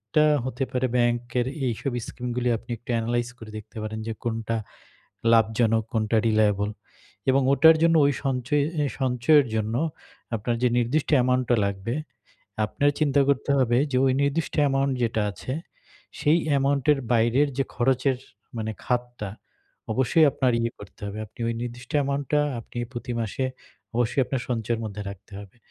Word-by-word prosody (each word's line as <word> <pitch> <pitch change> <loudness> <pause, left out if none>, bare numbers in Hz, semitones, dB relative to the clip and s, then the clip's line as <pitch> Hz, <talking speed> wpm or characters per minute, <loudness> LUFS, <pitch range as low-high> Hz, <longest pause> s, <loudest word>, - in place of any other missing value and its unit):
টা 155 - +6 0.2
হতে 130 +1 -2
পারে 130 -1 +1
ব্যাংকের 120 0 +1 0.2
এইসব 125 +3 -2 0.2
স্কিম 125 - -6
গুলো 125 0 0
আপনি 115 - -20
একটু 120 - -23
অ্যানালাইজ 120 +1 0
করে 110 -2 -11
দেখতে 110 +1 -11
পারেন। 110 0 -4
যে 115 - -2
কোনটা 115 -1 -2 0.8
লাভজনক, 110 0 +3
কোনটা 110 0 +1
রিলায়েবল। 105 -2 +2 0.6
এবং 135 +1 +4
ওটার 160 +4 +7
জন্য 165 0 +5
ওই 145 - +2
সঞ্চয়ে 135 +2 +1 0.4
সঞ্চয়ের 130 +3 +4
জন্য 110 +1 -1 0.6
আপনার 115 +3 -1
যে - - +6
নির্দিষ্ট 125 +6 +1
অ্যামাউন্টটা 125 -1 +2
লাগবে, 100 +3 -3 0.7
আপনার 145 +7 +1
চিন্তা 145 -2 +3
করতে 140 0 +1
হবে 120 -2 +3
যে - - +2
ওই 130 - +4
নির্দিষ্ট 140 +1 -1
অ্যামাউন্ট 135 -1 +2
যেটা 115 -2 +1
আছে, 115 +5 -6 0.7
সেই 155 +3 +3
অ্যামাউন্ট 140 -1 +2
এর 145 - 0
বাইরের 120 +5 +3
যে 135 - +2
খরচের 130 +1 +2 0.4
মানে 110 -1 -2
খাতটা, 120 -3 -2 0.6
অবশ্যই 130 +7 +4
আপনার 130 -3 +1
ইয়ে 115 - 0
করতে 100 - -13
হবে। 100 +1 -6
আপনি 110 - -18
ওই - - 0
নির্দিষ্ট 120 +1 -7
অ্যামাউন্ট 140 0 -1
টা 150 - +5 0.2
আপনি 115 - -16 0.2
প্রতি 120 0 -5
মাসে 115 +4 -2 0.5
অবশ্যই 120 +3 +1
আপনার 135 0 -2
সঞ্চয়ের 115 -1 -1
মধ্যে 105 -1 -5
রাখতে 100 +2 -13
হবে। 100 +1 -12
120 Hz, 155 wpm, -25 LUFS, 110-135 Hz, 0.8 s, ওটার